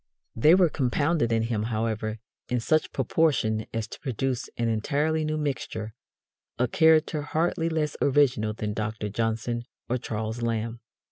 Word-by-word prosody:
They 150 +9 +6
were 185 -2 +5
compounded 145 -1 +1
in 115 0 +2
him, 115 -2 -1
however, 110 -1 -1 0.3
in 125 - +1
such 155 +7 +1
proportion 130 -6 +1
as 115 -1 -3
to - - -9
produce 130 0 -2
an 115 - 0
entirely 145 +8 0
new 155 0 -1
mixture 120 -7 -3 0.6
a 125 +1 +2
character 160 +2 +4
hardly 165 +3 0
less 155 -2 -1
original 130 -6 +3
than 105 -1 -3
Dr. 110 0 -3
Johnson 115 +2 -1 0.2
or 125 +1 0
Charles 110 +1 -4
Lamb. 115 0 -2
120 Hz, 145 wpm, -27 LUFS, 110-150 Hz, 0.6 s, They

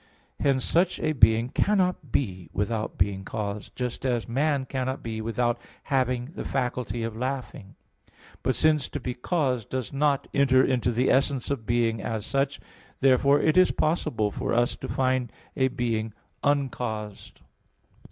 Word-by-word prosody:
Hence 135 -3 +2
such 175 +2 +2
a 155 - 0
being 115 -3 +4
cannot 180 - +1
be 95 - -1
without 110 +2 -2
being 95 +1 0
caused, 105 0 -5
just 125 -1 -4
as 120 -3 0
man 140 +2 +1
cannot 130 0 -3
be 110 -1 -4
without 120 +1 0 0.2
having 130 -1 0
the - - -5
faculty 125 -3 -2
of 115 -1 -4
laughing. 125 -5 -5 0.7
But, 130 - 0
since 155 -3 +3
to 145 - -4
be 125 -1 -3
caused 125 - -1
does 130 -3 -3
not 140 0 +1
enter 135 -2 +4
into 125 -2 +1
the 120 +3 +2
essence 135 0 +1
of 120 -6 -3
being 115 -2 +1
as 110 -1 -3
such, 135 0 0 0.4
therefore 135 +2 +4
is 185 +4 +5
it - - -5
possible 120 -10 +1
for - - -2
us 120 +1 +2
to - - -6
find 130 -3 0 0.2
a 130 -2 +3
being 115 -4 -2 0.3
uncaused. 120 -7 -2
125 Hz, 150 wpm, -26 LUFS, 115-140 Hz, 0.7 s, is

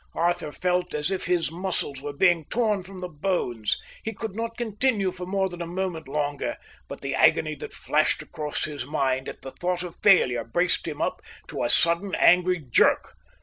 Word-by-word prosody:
Arthur 170 -2 0
felt 180 +1 -1
as 150 +5 0
if 190 - -2
his 175 -3 +1
muscles 170 -6 -2
were 145 +1 -4
being 170 +1 +3
torn 215 -2 +1
from 190 +1 -11
the 180 0 -4
bones, 145 - -1 0.3
he 220 - -2
could 220 -1 -6
not 230 +1 -4
continue 220 -3 0
for 180 0 -7
more 190 0 +1
than 175 -1 -7
a 170 - -3
moment 175 -3 -3
longer; 145 0 -2 0.3
but - - -8
the - - -3
agony - - +4
that - - -8
flashed - - +1
across 150 -1 -4
his 145 -4 -3
mind 130 -2 -1
at - - -10
the 135 - -7
thought 180 +3 -2
of 175 -2 -7
failure 125 - +5
braced 175 +12 +1
him 150 -2 -4 0.5
to - - -3
a 120 - +1
sudden 170 +8 +3
angry 180 +1 +5
jerk. 120 - +3
175 Hz, 190 wpm, -26 LUFS, 150-190 Hz, 0.5 s, failure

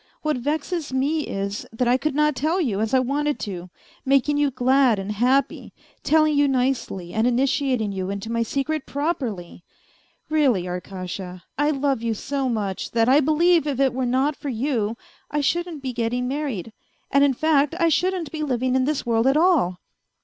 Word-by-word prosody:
What 305 -3 0
vezes 300 +4 -2
me 285 +4 0
is, 200 +1 -3
that 235 +2 -1
I 245 - +4
could 275 +2 -1
not 300 -1 +2
tell 315 +8 0
you 235 - 0
as 220 0 -1
I 265 - +4
wanted 285 +2 0
to, 180 -4 -5 0.3
making 275 +2 +2
you 290 -1 +2
glad 255 -2 +3
and 195 +1 -4
happy, 250 +6 0 0.3
telling 310 -1 +3
you 285 0 +4
nicely 250 -9 -1
and 220 +2 +2
Initiating 255 -3 +1
you 190 -1 -3
into 200 +3 -5
my 230 0 0
secret 275 +5 -2
properly.... 250 - -3 0.6
Really, 275 - +2
Arkasha, 180 0 -6
I 290 +1 +1
love 275 -4 0
you 230 -1 -1
so 275 +4 -2
much 205 -5 -2
that 230 -1 +3
I 275 +3 +6
believe 310 +2 +3
if 275 -3 -2
it 270 -2 +3
were 255 0 -1
not 265 +4 +1
for 285 - -6
you 230 -3 -1 0.3
I 295 - -1
shouldn't 330 +1 -1
be 260 -1 -3
getting 240 +1 -1
married, 255 - -3 0.4
and, 280 0 +4
in 275 -2 +3
fact, 295 +1 +2
I 335 -1 +4
shouldn't 355 -1 0
be 315 - -5
living 255 -3 0
in 260 -1 +2
this 295 -1 -1
world 230 +1 +2
at 270 +2 +4
all 305 - +2
265 Hz, 185 wpm, -23 LUFS, 225-295 Hz, 0.6 s, I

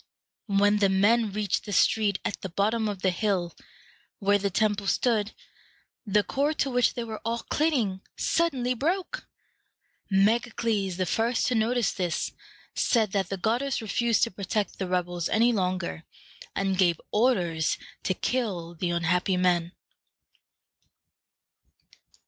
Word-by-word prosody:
When 205 +1 +3
the 200 -1 +4
men 210 +3 +3
reached 205 -1 -1
the 205 - -6
street 205 +1 +3
at - - -3
the 190 - -5
bottom 215 +5 0
of 195 -2 -6
the 190 - +3
hill 180 -3 -1 0.6
where 205 0 +2
the 200 0 0
temple 205 +1 0
stood, 220 -1 +1 0.8
the 205 +1 +3
cord 285 +9 -1
to 275 - 0
which 245 -1 +2
they 240 - -3
were 220 -2 -6
all 230 +1 -1
clinging 245 -12 +1 0.2
suddenly 265 -7 +1
broke. 350 - -2 0.8
Megacles, 210 -1 +1
the 185 - 0
first 225 +6 0
to - - 0
notice 230 -1 +1
this, 175 -4 -2 0.4
said 220 -5 +2
that 195 -3 -1
the 195 - -3
goddess 240 +8 0
refused 230 +1 +1
to - - +1
protect 200 +2 -3
the 190 - -2
rebels 175 -2 -1
any 235 +2 +3
longer, 185 -4 -2 0.5
and 195 -1 0
gave 175 -3 +3
orders 180 -9 +1 0.2
to 185 - -1
kill 190 -10 -2
the 175 +1 -2
unhappy 175 +2 +1
men. 175 -2 +2
205 Hz, 135 wpm, -27 LUFS, 185-230 Hz, 0.8 s, the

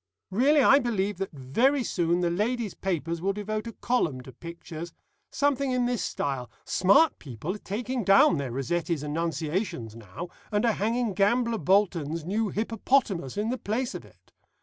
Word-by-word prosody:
Really 275 +8 +4
I 275 - +7
believe 210 -6 -1
that 195 - -3
very 230 - +1
soon 175 -4 0
the 175 -1 +1
ladies' 215 +3 -1
papers 170 -3 -2
will 195 +2 +1
devote 215 +2 -4
a - - -4
column 175 - -1
to 130 - -11
pictures. 170 +2 -8 0.4
Something 280 -1 +1
in 250 -1 +1
this 245 -5 0
style. 130 -4 -3 0.2
'Smart 200 - +4
people 140 - -5
are 210 - -8
taking 240 +5 -3
down 195 -3 +6
their 140 -3 -3
Rossetti's 165 +4 -1
Annunciations 155 - -2
now, 115 - -8 0.2
and 210 +2 +1
are 230 - +4
hanging 225 +1 0
Gambler 230 +4 +2
Bolton's 170 -3 +1
new 210 +4 0
Hippopotamus 215 - 0
in 210 +2 0
the 255 - -3
place 235 +4 -2
of - - -6
it. - - -22
195 Hz, 165 wpm, -27 LUFS, 165-235 Hz, 0.4 s, I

